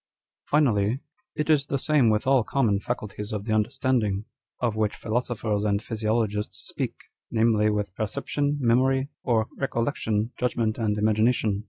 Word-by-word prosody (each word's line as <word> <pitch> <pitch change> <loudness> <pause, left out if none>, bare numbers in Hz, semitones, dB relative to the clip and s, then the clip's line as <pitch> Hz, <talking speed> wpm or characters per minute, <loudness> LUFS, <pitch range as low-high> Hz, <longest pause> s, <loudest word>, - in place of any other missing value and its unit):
" - - -66
Finally, 120 -6 +3 0.4
it 150 - -1
is 150 -3 +3
the 140 - 0
same 135 -3 +3
with 110 +3 +1
all 130 -2 +4
common 110 -6 +1
faculties 105 -2 -4
of 105 -2 -3
the 110 - 0
understanding 110 -3 +1 0.3
â€" 125 - +1
of 110 - -2
which 110 -1 0
philosophers 110 -3 -1
and 100 -1 +1
physio 110 +1 0
logists 105 0 -5
speak - - -3
â€" - - -48 0.3
namely, 110 -2 +3
with 105 -3 -1
perception, 145 +8 -1
memory., 130 +2 +2
or 115 -3 +2
recol 120 -4 0
lection, 110 -5 -1
judgment, 115 -3 0
and 105 -2 0
imagination. 110 -1 +2
110 Hz, 165 wpm, -26 LUFS, 105-130 Hz, 0.4 s, all